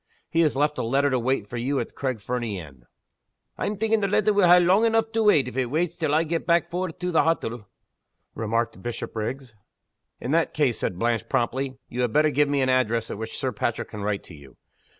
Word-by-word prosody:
He 165 Hz, -, +1 dB
has 155 Hz, -4 st, +3 dB
left 150 Hz, +2 st, +1 dB
a -, -, 0 dB
letter 135 Hz, +4 st, +2 dB
to 130 Hz, -, +1 dB
wait 125 Hz, -2 st, 0 dB
for 120 Hz, -, -6 dB
you 135 Hz, +4 st, -1 dB
at -, -, -3 dB
the -, -, -28 dB
Craig 130 Hz, -4 st, -3 dB
Fernie 120 Hz, -4 st, -3 dB
inn." 70 Hz, -7 st, -13 dB, 0.7 s
"I'm 210 Hz, -, -3 dB
thinking 220 Hz, +1 st, +2 dB
the 200 Hz, -, 0 dB
letter 210 Hz, +2 st, +2 dB
will 200 Hz, -3 st, +4 dB
ha' 175 Hz, +1 st, +8 dB
lang 185 Hz, +5 st, +4 dB
eneugh 225 Hz, 0 st, +2 dB
to 225 Hz, -, +1 dB
wait, 150 Hz, -11 st, +5 dB
if 125 Hz, -, -7 dB
it 130 Hz, -2 st, 0 dB
waits 165 Hz, +6 st, -1 dB
till 155 Hz, -3 st, 0 dB
I 160 Hz, -, +3 dB
gae 165 Hz, +1 st, -1 dB
back 170 Hz, +1 st, +1 dB
for 180 Hz, +1 st, -2 dB
it 165 Hz, -, -13 dB
to 180 Hz, 0 st, -1 dB
the 165 Hz, -, +4 dB
hottle," 120 Hz, -, -1 dB, 0.7 s
remarked 115 Hz, +1 st, -2 dB
Bishopriggs. 120 Hz, +1 st, -5 dB, 0.6 s
"In 125 Hz, -, -4 dB
that 165 Hz, +1 st, +1 dB
case," 140 Hz, -7 st, +1 dB
said 90 Hz, -, -2 dB
Blanche, 115 Hz, +2 st, -1 dB
promptly, 130 Hz, +1 st, -1 dB
"you 125 Hz, -, -4 dB
had 125 Hz, -3 st, 0 dB
better 150 Hz, 0 st, +4 dB
give 145 Hz, 0 st, +2 dB
me 140 Hz, -2 st, +1 dB
an 130 Hz, -, +1 dB
address 115 Hz, -3 st, +1 dB
at -, -, -6 dB
which 110 Hz, 0 st, -6 dB
Sir 130 Hz, -, -1 dB
Patrick 115 Hz, +1 st, -2 dB
can 105 Hz, -, -7 dB
write 100 Hz, -1 st, -2 dB
to -, -, -13 dB
you. 70 Hz, -4 st, -15 dB
135 Hz, 235 wpm, -25 LUFS, 115-165 Hz, 0.7 s, ha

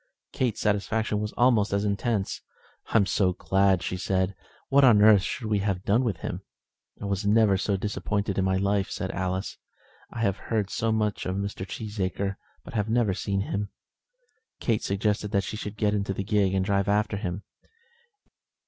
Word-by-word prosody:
Kate's 125 Hz, -5 st, -1 dB
satisfaction 105 Hz, +1 st, 0 dB
was 105 Hz, 0 st, -3 dB
almost 120 Hz, -4 st, +3 dB
as 100 Hz, +1 st, 0 dB
intense. 100 Hz, 0 st, -1 dB, 0.5 s
"I -, -, +2 dB
am 100 Hz, -, +4 dB
so 95 Hz, -2 st, +1 dB
glad," 95 Hz, 0 st, +2 dB
said 95 Hz, 0 st, 0 dB
she. 100 Hz, -, -13 dB, 0.3 s
"What 140 Hz, +1 st, +5 dB
on 120 Hz, -6 st, +7 dB
earth 105 Hz, -1 st, +7 dB
should 110 Hz, -, -4 dB
we 105 Hz, -1 st, +1 dB
have 95 Hz, -2 st, -1 dB
done 115 Hz, +6 st, +3 dB
with 100 Hz, -10 st, -2 dB
him?" -, -, -4 dB, 0.6 s
"I -, -, -6 dB, 0.2 s
never 110 Hz, 0 st, +4 dB
was 95 Hz, 0 st, +2 dB
so 100 Hz, -2 st, 0 dB
disappointed 100 Hz, 0 st, -2 dB
in -, -, +2 dB
my 95 Hz, 0 st, +1 dB
life," 100 Hz, 0 st, +1 dB
said 95 Hz, -, -3 dB
Alice. 95 Hz, +1 st, -3 dB, 0.5 s
"I 115 Hz, -, -6 dB
have 100 Hz, -4 st, +1 dB
heard 105 Hz, -3 st, -2 dB
so 115 Hz, 0 st, 0 dB
much 105 Hz, -3 st, -1 dB
of 95 Hz, -, -2 dB
Mr. 100 Hz, -1 st, -4 dB
Cheesacre, 100 Hz, -2 st, -3 dB, 0.3 s
but 145 Hz, -, -11 dB
have 105 Hz, -2 st, -1 dB
never 115 Hz, -4 st, +2 dB
seen 100 Hz, +1 st, -1 dB
him." 100 Hz, 0 st, -3 dB, 0.9 s
Kate 115 Hz, -3 st, 0 dB
suggested 105 Hz, +1 st, -1 dB
that 100 Hz, -1 st, +2 dB
she -, -, -5 dB
should 105 Hz, -1 st, -6 dB
get 105 Hz, 0 st, +1 dB
into 100 Hz, -2 st, -1 dB
the 100 Hz, -, -2 dB
gig 100 Hz, -2 st, +1 dB
and 95 Hz, -1 st, +1 dB
drive 100 Hz, -1 st, +1 dB
after 105 Hz, 0 st, +1 dB
him. 100 Hz, -1 st, -4 dB
100 Hz, 185 wpm, -26 LUFS, 95-110 Hz, 0.9 s, on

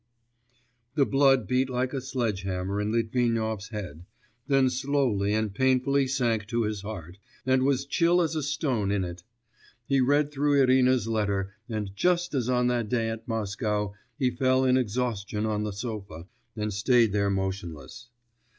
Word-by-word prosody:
The 140 Hz, -3 st, +4 dB
blood 135 Hz, -4 st, +3 dB
beat 130 Hz, +4 st, +1 dB
like 130 Hz, +1 st, -1 dB
a 135 Hz, -, -2 dB
sledge 120 Hz, -7 st, -2 dB
hammer 95 Hz, +1 st, -2 dB
in 105 Hz, +1 st, -1 dB
Litvinov's 115 Hz, -2 st, 0 dB
head, 95 Hz, -8 st, -7 dB, 0.4 s
then 135 Hz, -2 st, +4 dB
slowly 130 Hz, -6 st, 0 dB
and 110 Hz, -1 st, 0 dB
painfully 130 Hz, +3 st, +2 dB
sank 120 Hz, -5 st, 0 dB
to 120 Hz, 0 st, 0 dB
his 105 Hz, -2 st, -2 dB
heart, 95 Hz, -3 st, -8 dB, 0.3 s
and 130 Hz, 0 st, +3 dB
was 135 Hz, 0 st, +1 dB
chill 170 Hz, +5 st, +3 dB
as 165 Hz, -2 st, +1 dB
a 155 Hz, -, 0 dB
stone 135 Hz, -7 st, -1 dB
in 100 Hz, -1 st, +1 dB
it. 85 Hz, -1 st, -6 dB, 0.6 s
He 135 Hz, +1 st, +2 dB
read 145 Hz, +3 st, +2 dB
through 145 Hz, 0 st, +2 dB
Irina's 130 Hz, -3 st, +4 dB
letter, 100 Hz, -3 st, -1 dB, 0.2 s
and 105 Hz, -3 st, -4 dB
just 175 Hz, -, +1 dB
as 130 Hz, -3 st, 0 dB
on 125 Hz, -1 st, +2 dB
that 120 Hz, -3 st, 0 dB
day 115 Hz, -1 st, 0 dB
at 115 Hz, 0 st, -6 dB
Moscow 105 Hz, -2 st, -2 dB, 0.2 s
he 130 Hz, -4 st, +1 dB
fell 130 Hz, +1 st, +2 dB
in 130 Hz, 0 st, +4 dB
exhaustion 110 Hz, -3 st, -1 dB
on 105 Hz, -1 st, -1 dB
the 105 Hz, -, -3 dB
sofa, 100 Hz, -6 st, -6 dB, 0.3 s
and 105 Hz, -1 st, -2 dB
stayed 115 Hz, +2 st, +3 dB
there 100 Hz, 0 st, +1 dB
motionless. 95 Hz, -, -4 dB
115 Hz, 160 wpm, -27 LUFS, 105-130 Hz, 0.6 s, The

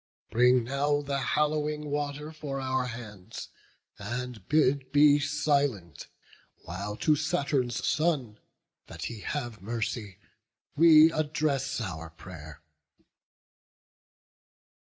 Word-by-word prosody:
Bring 125 Hz, +1 st, +4 dB
now 145 Hz, +4 st, 0 dB
the 140 Hz, -1 st, -2 dB
hallowing 150 Hz, +2 st, 0 dB
water 145 Hz, +1 st, -3 dB
for 150 Hz, -3 st, -5 dB
our 130 Hz, -1 st, -1 dB
hands; 105 Hz, -6 st, -8 dB, 0.5 s
And 120 Hz, -1 st, -5 dB
bid 140 Hz, -3 st, +2 dB
be 145 Hz, 0 st, +6 dB
silent, 145 Hz, -, 0 dB, 0.6 s
while 100 Hz, +4 st, -5 dB
to 155 Hz, +5 st, +3 dB
Saturn's 140 Hz, -6 st, -1 dB
son, 140 Hz, -10 st, 0 dB, 0.5 s
That -, -, -8 dB
he 115 Hz, -2 st, -5 dB
have 120 Hz, -3 st, -4 dB
mercy, 110 Hz, -2 st, -4 dB, 0.6 s
we 160 Hz, 0 st, +8 dB
address 150 Hz, -4 st, -1 dB
our 85 Hz, -7 st, -5 dB
pray'r." 80 Hz, -3 st, -11 dB
135 Hz, 95 wpm, -28 LUFS, 110-150 Hz, 0.6 s, we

